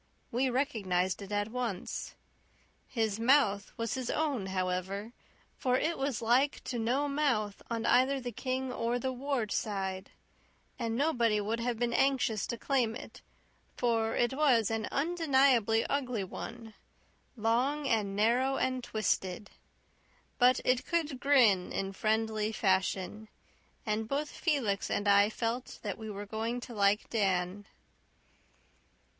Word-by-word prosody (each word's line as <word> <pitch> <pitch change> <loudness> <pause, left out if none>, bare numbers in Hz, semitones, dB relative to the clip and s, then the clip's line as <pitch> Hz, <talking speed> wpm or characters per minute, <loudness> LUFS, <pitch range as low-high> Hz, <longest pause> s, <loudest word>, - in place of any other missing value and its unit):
We 255 +3 +1
recognized 205 -9 0
it 200 0 -8
at 205 +1 -1
once. 235 -7 -4 0.7
His 220 -4 -1
mouth 230 -5 +3
was 230 -1 -2
his 260 -3 -3
own, 280 -11 -1
however, 190 +3 -2 0.5
for 255 -1 +2
it 330 +5 0
was 270 -4 -2
like 255 +5 +2
to 245 - -3
no 255 +6 +1
mouth 255 -9 0
on 230 -1 -2
either 260 +2 +4
the 245 -1 -5
King 260 +2 -3
or 235 +1 0
the 260 +1 -2
Ward 255 -4 -2
side; 190 -2 -2 0.7
and 230 -2 -1
nobody 240 -6 +2
would 215 +3 -2
have 235 0 -1
been 240 0 0
anxious 260 -6 +1
to 235 - -3
claim 245 -4 0
it, - - -10 0.6
for 225 -2 +1
it 240 +1 +1
was 260 -7 +3
an 225 -1 -1
undeniably 270 -8 +3
ugly 250 -7 -1
one 225 +4 -8 0.6
long 250 +7 +1
and 205 -5 0
narrow 245 +6 +2
and 255 -1 -1
twisted. 205 -4 -2 0.9
But 250 +1 +5
it 255 0 +2
could 310 -6 -1
grin 240 -10 +4
in 195 0 -3
friendly 220 +1 0
fashion, 190 +1 0 0.6
and 215 0 -1
both 290 +4 -2
Felix 250 - 0
and 205 - -1
I 200 +1 +6
felt 230 +2 -3
that - - -4
we 220 -1 -6
were 205 0 -6
going 225 +3 -3
to 240 - -8
like 205 0 +2
Dan. 195 -2 0
230 Hz, 140 wpm, -31 LUFS, 205-260 Hz, 0.9 s, I